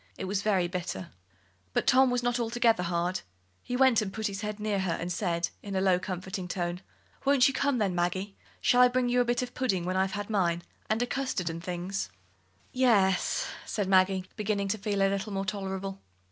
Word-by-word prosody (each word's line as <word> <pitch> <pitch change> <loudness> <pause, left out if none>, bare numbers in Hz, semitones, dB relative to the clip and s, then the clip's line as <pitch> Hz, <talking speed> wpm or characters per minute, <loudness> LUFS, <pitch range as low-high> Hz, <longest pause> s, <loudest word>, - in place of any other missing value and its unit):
It - - -4
was 195 +1 -1
very 195 -4 +2
bitter. 175 - -5 0.6
But - - +1
Tom 265 0 +5
was 245 0 0
not 245 0 +1
altogether 230 -3 +2
hard. 175 +1 -1 0.4
He 250 - -3
went 260 -4 +5
and 200 -2 -3
put 220 +2 -4
his 200 -1 -2
head 210 0 -4
near 210 -1 0
her, 190 -3 0
and 175 +1 -3
said, 170 -3 0
in 200 -1 -6
a - - +2
lower, 190 -2 +3
comforting 185 0 -5
tone: 175 0 -3 0.4
"Won't 275 -2 +5
you 275 - 0
come, 280 0 +1
then, 200 -5 +1
Maggie? 180 +3 -1 0.3
Shall 250 - +5
I 250 - +9
bring 250 0 +1
you 245 0 +3
a - - +1
bit 240 +1 +1
of 250 - -7
pudding 195 -9 0
when 185 +1 -1
I've 190 0 +1
had 205 0 -3
mine 175 -5 +1 0.3
and 220 +2 +2
a - - +1
custard 245 -10 -2
and 165 0 -7
things?" 180 - -3 0.6
"Ye 255 0 +2
e - - +6
es," 190 -4 +3 0.2
said 205 -3 -2
Maggie, 190 0 +3
beginning 205 -2 -1
to 220 +2 -1
feel 205 0 -1
life 195 0 +3
a - - -1
little 200 +1 -3
more 195 0 -1
tolerable. 195 -1 -4
195 Hz, 220 wpm, -29 LUFS, 185-235 Hz, 0.6 s, I